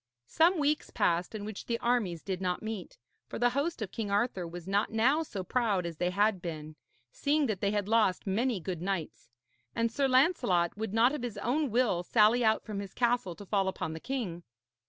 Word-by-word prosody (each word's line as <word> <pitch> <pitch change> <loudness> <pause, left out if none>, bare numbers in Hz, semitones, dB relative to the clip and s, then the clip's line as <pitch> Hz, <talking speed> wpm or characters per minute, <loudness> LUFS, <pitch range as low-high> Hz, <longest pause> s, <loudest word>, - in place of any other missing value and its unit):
Some 335 - +3
weeks 300 0 0
passed 175 +4 0
in 205 -1 -5
which 215 -2 -7
the 235 - 0
armies 230 -9 0
did 190 -2 -3
not 180 +1 -1
meet; 220 -4 -6 0.3
for - - -6
the 245 +1 +3
host 280 0 -1
of 195 - -6
King 220 -3 -4
Arthur 200 -3 0
was 175 +1 -9
not 200 +2 +1
now 250 +8 +3
so 205 -12 -5
proud 205 -3 0
as 170 -2 -5
they 180 +2 0
had 200 0 +1
been, 155 -3 -6 0.4
seeing 295 +1 +1
that 215 -7 -2
they 200 - +2
had 205 -1 -1
lost 215 -4 +2
many 220 +3 0
good 175 -1 -5
knights; 180 -9 -4 0.5
and 230 0 +1
Sir 275 +3 +1
Lancelot 255 - +3
would 220 0 -4
not 240 +4 +4
of 300 - -3
his 240 -4 -5
own 265 +7 0
will 230 -6 +2
sally 220 +5 +4
out 220 -1 +3
from 210 -3 -4
his 200 -1 -7
castle 240 -7 +1
to 205 - -11
fall 195 -1 +1
upon 160 -4 -3
the 160 - -6
king. 205 -8 -4
210 Hz, 210 wpm, -30 LUFS, 185-245 Hz, 0.5 s, not